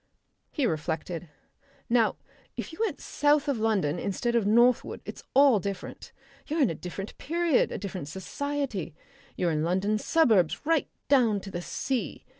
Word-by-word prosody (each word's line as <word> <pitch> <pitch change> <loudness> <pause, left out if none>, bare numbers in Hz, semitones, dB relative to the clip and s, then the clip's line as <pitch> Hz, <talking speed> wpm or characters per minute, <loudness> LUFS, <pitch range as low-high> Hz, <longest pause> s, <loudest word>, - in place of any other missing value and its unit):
He 285 - -1
reflected. 160 -1 -3 0.6
"Now 230 -2 +3 0.4
if - - -5
you - - -11
went 450 - -1
south 295 0 +2
of 275 -5 0
London 195 -8 +1
instead 235 +5 -1
of 225 -4 +2
northward 240 +3 +3
it's - - -7
all 270 -5 +6
different. 195 0 -6 0.4
You're 315 0 +1
in 245 - +2
a - - -2
different 180 +5 -7
period, 335 -1 +1
a - - -3
different 185 -7 -5
society. 220 - -4 0.4
You're 175 -2 +1
in 155 -1 0
London 190 +5 +1
suburbs 215 - +3
right 325 -2 +2 0.2
down 240 -7 +4
to 195 - -9
the 175 - -4
sea. 260 +7 -3
215 Hz, 155 wpm, -28 LUFS, 180-280 Hz, 0.6 s, all